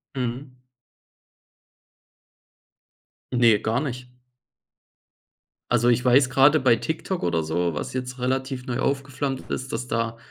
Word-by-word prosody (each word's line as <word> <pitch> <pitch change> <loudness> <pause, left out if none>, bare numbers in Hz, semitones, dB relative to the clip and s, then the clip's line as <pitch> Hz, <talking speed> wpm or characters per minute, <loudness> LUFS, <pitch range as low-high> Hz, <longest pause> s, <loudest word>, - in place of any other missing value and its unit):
Mhm. 125 +1 -4 2.7
Ne, 120 -3 +5
gar 115 +2 0
nicht. 125 -4 -5 1.6
Also, 120 0 +3
ich 120 +1 +2
weiß, 130 +1 +4
gerade 145 +4 +5
bei 120 -3 +4
TikTok 165 - -3
oder 85 -2 0
so, 85 +1 -1
was - - -4
jetzt 125 0 -4
relativ 130 0 -2
neu 125 0 -3
aufgeflammt 135 0 -2
ist, 130 +1 -4
dass 125 - -4
da 115 -1 -2
125 Hz, 115 wpm, -24 LUFS, 120-135 Hz, 2.7 s, Ne